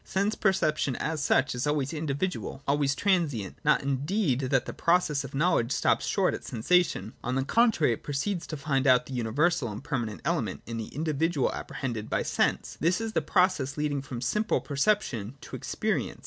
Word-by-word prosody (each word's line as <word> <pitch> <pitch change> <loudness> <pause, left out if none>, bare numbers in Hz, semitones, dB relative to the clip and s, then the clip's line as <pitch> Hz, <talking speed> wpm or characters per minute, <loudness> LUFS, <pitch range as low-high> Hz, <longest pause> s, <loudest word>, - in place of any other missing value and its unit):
Sense 200 +3 0
perception 155 - +1
as 155 +2 -2
such 145 - +2
is 125 +3 -2
always 145 0 0
individual, 155 0 -3
always 140 -1 +2
transient: 155 - 0
not 150 -1 +3
indeed 140 - 0
that 130 -2 +2
the - - -5
pro 170 +1 +4
cess 150 -6 -2
of 135 0 -8
knowledge 145 -5 +2
stops - - +1
short - - +2
at - - -5
sensation: 120 - +1
on 125 +1 -1
the 135 0 0
contrary, 220 - +3
it - - -7
proceeds 165 +6 -2
to 155 - -5
find 140 -1 0
out 125 -1 +5
the 135 - -8
universal 125 +3 +1
and 105 +6 -7
permanent 115 -8 -3
element 145 - -1
in 115 0 -5
the 110 - -4
individual 155 -1 0
apprehended 115 -5 -5
by - - 0
sense. - - 0
This 170 +4 +2
is 225 -1 -3
the - - +2
pro 185 -2 +4
cess 140 -7 -5
leading 145 -2 -1
from 130 -3 -7
simple 210 - +1
perception 140 - 0
to - - -8
experience. - - -2
145 Hz, 190 wpm, -28 LUFS, 130-170 Hz, -, out